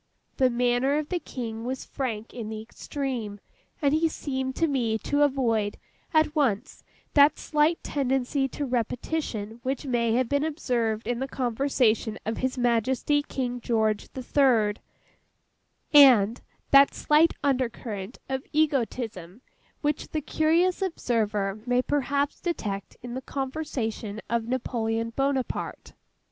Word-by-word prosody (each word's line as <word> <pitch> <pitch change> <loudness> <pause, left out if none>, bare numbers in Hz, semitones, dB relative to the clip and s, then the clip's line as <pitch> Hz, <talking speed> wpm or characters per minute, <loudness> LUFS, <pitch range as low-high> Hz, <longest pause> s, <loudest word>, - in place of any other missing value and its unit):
The 260 -1 +4
manner 245 +3 +2
of 305 -1 -3
the 360 - -1
King 225 -7 -6
was 260 +2 -4
frank 230 -5 -4
in 230 -3 -5
the 220 -1 -5
extreme; 230 -2 -5 0.4
and 285 0 +3
he 320 +1 +3
seemed 265 -4 -3
to 330 - +2
me 245 -7 0
to 285 +6 0
avoid, 235 -7 +1 0.3
at 315 -1 +3
once 255 -6 0 0.3
that 285 +1 +6
slight 305 +2 +1
tendency 270 0 0
to 285 +2 -4
repetition 240 -2 -2
which 265 +3 -3
may 235 -3 +1
have 250 +1 +2
been 285 +3 +1
observed 240 -8 -1
in 240 +1 -1
the 265 - -2
conversation 240 -4 +1
of 220 +1 -2
His 260 0 -1
Majesty 250 +4 +2
King 250 -3 -3
George 220 -2 0
the 260 - -6
Third, 235 -7 +3 1.1
and—that 270 +1 +5
slight 305 +2 +4
under 260 -3 +2
current 210 -2 -7
of 265 0 -2
egotism 240 - -1 0.4
which 295 -1 -1
the 310 - -3
curious 330 +5 +2
observer 215 - -1
may 245 +1 +2
perhaps 285 +1 0
detect 205 - -4
in 245 -1 -6
the 260 - -4
conversation 260 -7 -4
of 230 -1 0
Napoleon 230 -2 -1
Bonaparte. 270 0 -2
255 Hz, 130 wpm, -26 LUFS, 225-285 Hz, 1.1 s, that